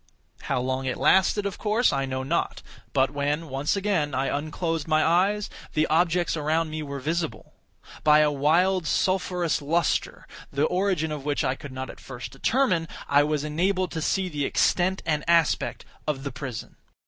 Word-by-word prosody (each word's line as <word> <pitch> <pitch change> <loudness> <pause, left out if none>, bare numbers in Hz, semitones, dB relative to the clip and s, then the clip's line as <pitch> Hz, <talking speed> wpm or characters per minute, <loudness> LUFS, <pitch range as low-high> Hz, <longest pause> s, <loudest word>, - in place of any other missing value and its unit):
How - - -1
long 130 +1 -2
it 130 - -2
lasted 190 +2 +3
of 200 - -4
course, 220 +3 +2
I 135 -1 0
know 130 0 -3
not; 160 +6 -1 0.3
but 135 0 +2
when, 145 +3 -2
once 135 +6 0
again, 190 -7 0
I 135 +2 0
unclosed 155 +2 -2
my 155 -1 +3
eyes, 195 +5 +2 0.3
the 155 0 +3
objects 175 +1 +2
around 155 +1 0
me 155 0 -4
were 140 -2 -5
visible. 160 +3 -3 0.5
By 150 0 +6
a 150 -1 +3
wild 165 +5 +2
sulphurous 180 -3 0
lustre, 165 +4 0 0.3
the 140 - 0
origin 180 -3 0
of 150 -2 -5
which 145 0 0
I 130 - +1
could 140 0 -9
not 130 0 -5
at - - -15
first 120 -3 -8
determine, 185 - +1 0.2
I 145 0 +5
was 150 0 0
enabled 180 +4 0
to 160 - -3
see 190 +4 0
the 150 -5 -3
extent 185 +6 +1
and 150 -2 0
aspect 170 -2 +2 0.2
of 140 -3 -1
the 140 - -4
prison. 125 -2 -7
155 Hz, 175 wpm, -26 LUFS, 140-180 Hz, 0.5 s, By